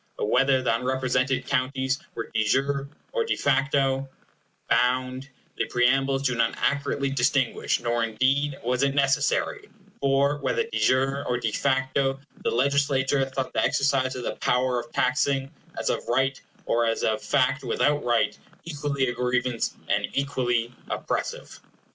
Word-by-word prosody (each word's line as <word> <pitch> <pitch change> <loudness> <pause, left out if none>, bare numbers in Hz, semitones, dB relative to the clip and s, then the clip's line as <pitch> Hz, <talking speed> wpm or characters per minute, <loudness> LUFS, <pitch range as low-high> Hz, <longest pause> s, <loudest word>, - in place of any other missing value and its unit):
But 105 - -1
whether 130 0 +3
the 115 - +2
unrepresented 130 +1 0
counties 130 0 0 0.2
were 115 - -5
de 110 - +2
jure 135 +5 0 0.2
or - - 0
de 455 - -1
facto 135 -1 +1 0.6
bound, 130 +2 +1 0.3
the - - 0
preambles 135 +2 +2
do 125 -2 +1
not 115 -1 +1
accurately 140 -1 0
distinguish, 130 -1 +1
nor 120 -1 0
indeed 135 +5 +1
was 125 +2 0
it 140 0 +1
necessary; 145 - +1 0.3
for, 140 +1 +2
whether 460 - 0
de 455 - -4
jure 135 +2 +2
or 120 - +1
de 115 -2 -2
facto, 135 +1 0 0.2
the - - +1
Legislature 140 +1 +2
thought 130 0 -4
the - - +1
exercise 135 -2 +1
of 125 - -5
the - - -4
power 125 0 +1
of 120 0 -9
taxing 135 0 +1 0.3
as - - 0
of - - -4
right, 130 +2 +1 0.2
or 115 0 +1
as 115 - -1
of 110 -1 +1
fact 135 +1 +1
without 145 +4 +1
right, 115 -4 +1 0.3
equally 145 -4 -1
a 125 - -1
grievance, 125 0 -1
and - - +1
equally 125 -4 0 0.2
oppressive. - - -4
130 Hz, 150 wpm, -25 LUFS, 125-140 Hz, 0.6 s, whether